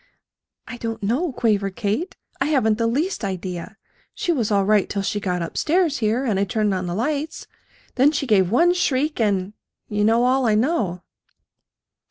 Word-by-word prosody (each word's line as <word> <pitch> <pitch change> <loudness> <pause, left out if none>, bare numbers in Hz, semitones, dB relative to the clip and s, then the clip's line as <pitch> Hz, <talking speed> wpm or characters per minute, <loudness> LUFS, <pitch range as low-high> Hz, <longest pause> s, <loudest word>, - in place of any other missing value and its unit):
"I 240 - -7
don't 225 -2 -5
know," 270 - 0
quavered 205 -6 0
Kate. 235 - -2 0.2
"I 270 - +1
haven't 240 -7 +2
the 230 - +2
least 300 - -1
idea. 185 +1 -5 0.4
She 350 - -1
was 245 -10 0
all 200 -2 +2
right 210 -1 +3
till 200 -1 -2
she 205 - -1
got 180 -3 -2
up 165 - -7
stairs 330 -2 +1
here, 225 +4 0
and 210 -6 0
I - - +2
turned 210 +1 0
on 185 -1 -2
the 175 - -3
lights. 295 +7 -2 0.5
Then 270 +3 +4
she 285 -2 -2
gave 195 -7 +3
one 340 - +4
shriek 300 -4 0
and 200 -2 0 0.4
you 210 0 0
know 225 +3 +3
all 255 0 +2
I 215 - +3
know." 215 - 0
225 Hz, 185 wpm, -22 LUFS, 200-270 Hz, 0.5 s, Then